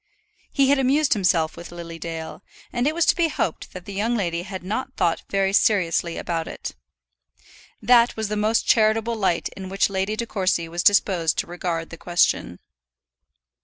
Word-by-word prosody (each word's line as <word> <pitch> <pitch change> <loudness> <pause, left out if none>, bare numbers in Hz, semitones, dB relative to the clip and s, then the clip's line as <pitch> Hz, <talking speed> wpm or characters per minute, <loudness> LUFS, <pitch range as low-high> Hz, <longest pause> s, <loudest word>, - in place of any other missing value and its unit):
He 275 -2 +3
had 280 0 +4
amused 275 +3 +3
himself 180 -6 +1
with 170 - -10
Lily 170 -1 -8
Dale, 165 +1 -6 0.3
and 245 +2 0
it 310 - 0
was 340 - +2
to - - +4
be 340 -2 +2
hoped 240 - -3
that 185 -1 -9
the 200 - -8
young 220 +5 0
lady 170 -4 -1
had 190 0 -7
not 255 +8 -4
thought 170 -2 +1
very 195 -1 +1
seriously 175 -5 +2
about 165 -2 -3
it. - - -6 1.1
That 240 +1 +5
was 220 -1 -2
the 210 - -3
most 215 +2 +1
charitable 225 +1 +3
light 190 -6 0
in 190 -1 -9
which 195 +1 +1
Lady 195 +2 -1
De 235 - -3
Courcy 185 -6 -1
was 170 +1 -3
disposed 180 -5 +3
to - - 0
regard 170 -1 -4
the 165 - -8
question. 175 - +1
195 Hz, 180 wpm, -23 LUFS, 170-225 Hz, 1.1 s, That